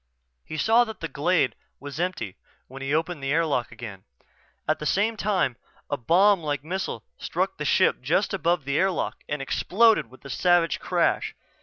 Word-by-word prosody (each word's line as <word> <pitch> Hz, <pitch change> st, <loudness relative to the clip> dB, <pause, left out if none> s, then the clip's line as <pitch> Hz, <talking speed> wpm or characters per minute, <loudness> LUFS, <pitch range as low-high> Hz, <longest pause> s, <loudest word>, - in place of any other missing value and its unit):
He 155 Hz, -, -7 dB
saw 225 Hz, +10 st, +5 dB
that 220 Hz, -3 st, -8 dB
the 165 Hz, -, -3 dB
glade 160 Hz, -1 st, +1 dB, 0.3 s
was 145 Hz, +2 st, -7 dB
empty 175 Hz, -, -2 dB, 0.3 s
when 135 Hz, +1 st, -10 dB
he 135 Hz, +1 st, -3 dB
opened 160 Hz, 0 st, 0 dB
the 135 Hz, 0 st, -2 dB
airlock 150 Hz, -7 st, +1 dB
again. 115 Hz, -5 st, -9 dB, 0.6 s
At -, -, +1 dB
the 150 Hz, -, -2 dB
same 215 Hz, +7 st, +2 dB
time 190 Hz, -, 0 dB, 0.3 s
a -, -, +2 dB
bomb 190 Hz, -, +4 dB
like 145 Hz, -4 st, -3 dB
missile 185 Hz, +5 st, -3 dB, 0.2 s
struck -, -, -2 dB
the -, -, -2 dB
ship -, -, +3 dB
just -, -, +1 dB
above 175 Hz, -5 st, +1 dB
the 140 Hz, +1 st, 0 dB
airlock 190 Hz, -1 st, 0 dB
and 145 Hz, -1 st, -2 dB
exploded 220 Hz, +10 st, +3 dB
with 130 Hz, +2 st, -18 dB
a -, -, -7 dB
savage 175 Hz, -1 st, +3 dB
crash. -, -, 0 dB
160 Hz, 175 wpm, -25 LUFS, 135-185 Hz, 0.6 s, saw